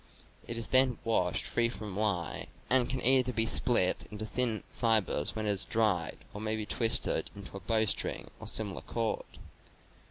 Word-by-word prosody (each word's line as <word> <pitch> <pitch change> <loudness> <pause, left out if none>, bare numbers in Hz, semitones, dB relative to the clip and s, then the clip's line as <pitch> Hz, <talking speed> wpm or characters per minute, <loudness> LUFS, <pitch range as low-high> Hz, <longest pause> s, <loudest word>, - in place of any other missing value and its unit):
It 115 - -2
is 115 - -3
then 130 -2 +6
washed 90 -6 0
free 120 0 0
from 105 -3 -8
lye 100 -5 -2 0.2
and 130 -1 +4
can 130 -2 -3
either 130 0 +4
be 110 -1 +2
split 115 -4 +2
into 105 +1 -5
thin 115 -1 -1
fibers 110 -10 +1
when 110 -1 -3
it - - 0
has 100 -2 +1
dried 105 -7 0 0.2
or 105 - -7
may 110 0 -2
be 110 -1 -4
twisted 115 +2 +2
into 100 0 -11
a - - -6
bowstring 110 +1 -1
or - - -8
similar 105 -3 0
cord. 115 -2 -4
110 Hz, 170 wpm, -30 LUFS, 105-115 Hz, 0.2 s, then